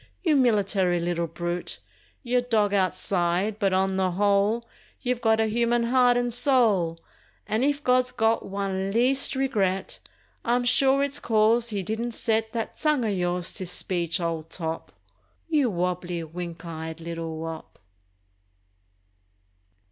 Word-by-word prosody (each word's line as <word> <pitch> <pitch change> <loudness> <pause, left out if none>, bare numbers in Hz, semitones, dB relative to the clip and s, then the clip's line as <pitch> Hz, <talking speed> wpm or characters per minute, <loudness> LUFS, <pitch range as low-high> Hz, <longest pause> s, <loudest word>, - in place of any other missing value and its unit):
You 320 -5 +3
military 200 -8 +2
little 170 0 -1
brute, 175 +2 -4 0.5
You're 250 0 +1
dog 220 -4 +1
outside 185 +1 0
but 195 -3 +2
on 190 0 +1
the 190 -1 +2
whole 205 +5 +1 0.3
You've 250 -2 -2
got 220 -1 +3
a 220 - +3
human 235 +2 +1
heart 245 0 +4
and 245 -1 0
soul 220 - +2 0.5
And 220 +3 0
if 290 +1 0
God's 250 0 +2
got 225 -2 +1
one 195 -1 -3
least 255 +6 +2
regret 205 -8 -1 0.4
I'm 245 +1 +1
sure 270 +2 +3
it's 280 +1 -1
cause 225 +1 +2
he 205 -3 -2
didn't 225 +5 -3
set 220 0 0
That 225 -1 -4
tongue 300 -6 +1
of 210 - 0
yours 175 -1 -1
to 185 -3 -5
speech, 175 -1 -1
old 165 -2 -3
top— 165 -2 -5 0.6
You 295 -6 +2
wobbly, 180 -2 -2
wink 170 +1 -7
eyed 160 0 -6
little 165 -1 -5
wop! 160 0 -7
205 Hz, 140 wpm, -25 LUFS, 175-240 Hz, 0.6 s, heart